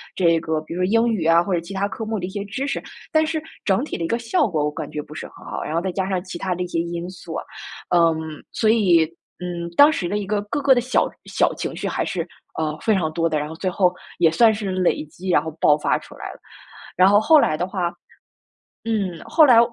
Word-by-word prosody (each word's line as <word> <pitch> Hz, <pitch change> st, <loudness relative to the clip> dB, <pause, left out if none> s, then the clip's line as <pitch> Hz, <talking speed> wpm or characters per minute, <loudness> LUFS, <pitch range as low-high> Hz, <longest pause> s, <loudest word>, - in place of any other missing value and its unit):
这 170 Hz, -3 st, +3 dB
个 160 Hz, -1 st, -2 dB
比 155 Hz, +2 st, -8 dB
如 180 Hz, -, 0 dB
说 -, -, +4 dB
英 225 Hz, +4 st, +3 dB
语 195 Hz, -8 st, -1 dB
啊， 165 Hz, +1 st, +5 dB
或 195 Hz, -, -4 dB
者 175 Hz, -, +2 dB
其 170 Hz, +4 st, -9 dB
它 195 Hz, +1 st, 0 dB
科 205 Hz, +3 st, -6 dB
目 220 Hz, -1 st, -2 dB
的 180 Hz, -, -3 dB
一 -, -, -7 dB
些 200 Hz, +1 st, -5 dB
知 250 Hz, +8 st, -3 dB
识。 -, -, -2 dB, 0.3 s
但 315 Hz, 0 st, +3 dB
是 315 Hz, 0 st, -2 dB, 0.2 s
整 195 Hz, +4 st, +2 dB
体 300 Hz, -, -4 dB
的 -, -, -3 dB
一 -, -, -1 dB
个 230 Hz, -, 0 dB
效 250 Hz, +5 st, +1 dB
果 160 Hz, -7 st, -1 dB
我 150 Hz, -, 0 dB
感 -, -, -6 dB
觉 150 Hz, -, -3 dB
不 150 Hz, +1 st, -12 dB
是 -, -, -6 dB
很 -, -, -16 dB
好， -, -, -4 dB
然 150 Hz, -, -4 dB
后 165 Hz, -, +1 dB
再 190 Hz, +1 st, -2 dB
加 190 Hz, +1 st, -2 dB
上 185 Hz, -2 st, -1 dB
其 185 Hz, -2 st, -7 dB
他 185 Hz, 0 st, -2 dB
的 180 Hz, -, -5 dB
一 180 Hz, -, -2 dB
些 170 Hz, -, -2 dB
因 170 Hz, +1 st, -3 dB
素 175 Hz, -3 st, -9 dB
啊， -, -, -3 dB, 0.5 s
嗯， 165 Hz, -1 st, +5 dB, 0.4 s
所 220 Hz, -, +1 dB
以， 190 Hz, -7 st, +5 dB, 0.4 s
嗯， 175 Hz, -1 st, -4 dB
当 290 Hz, -, +8 dB
时 185 Hz, -, -2 dB
的 205 Hz, +4 st, -1 dB
一 200 Hz, -, -5 dB
个 210 Hz, +1 st, 0 dB
各 285 Hz, +8 st, -3 dB
个 275 Hz, -1 st, +5 dB
的 -, -, +3 dB
小 255 Hz, +2 st, +1 dB, 0.2 s
小 -, -, +1 dB
情 -, -, -4 dB
绪 -, -, -3 dB
还 -, -, -1 dB
是， 180 Hz, -, -2 dB, 0.4 s
呃， 155 Hz, -1 st, -1 dB
非 220 Hz, -, +2 dB
常 170 Hz, -6 st, 0 dB
多 165 Hz, +1 st, +1 dB
的。 155 Hz, -2 st, 0 dB
然 150 Hz, +1 st, -4 dB
后 160 Hz, -, -7 dB
最 185 Hz, -, -4 dB
后 185 Hz, 0 st, +3 dB, 0.3 s
也 170 Hz, -2 st, +5 dB
算 220 Hz, +7 st, +5 dB
是 205 Hz, -2 st, -3 dB
累 185 Hz, -4 st, +1 dB
积， 180 Hz, +5 st, -8 dB
然 175 Hz, -, +4 dB
后 160 Hz, -, -4 dB
爆 150 Hz, -, +5 dB
发 150 Hz, -, +1 dB
出 -, -, -13 dB
来 -, -, -6 dB
了。 -, -, -16 dB, 0.6 s
然 185 Hz, +2 st, +6 dB
后 205 Hz, +1 st, +6 dB
后 305 Hz, +8 st, +6 dB
来 155 Hz, -, +2 dB
的 180 Hz, -, -1 dB
话， 185 Hz, -3 st, -2 dB, 0.9 s
嗯， 200 Hz, -7 st, -1 dB
后 315 Hz, -1 st, +5 dB
来 245 Hz, -4 st, +7 dB
185 Hz, 290 characters per minute, -22 LUFS, 170-215 Hz, 0.9 s, 当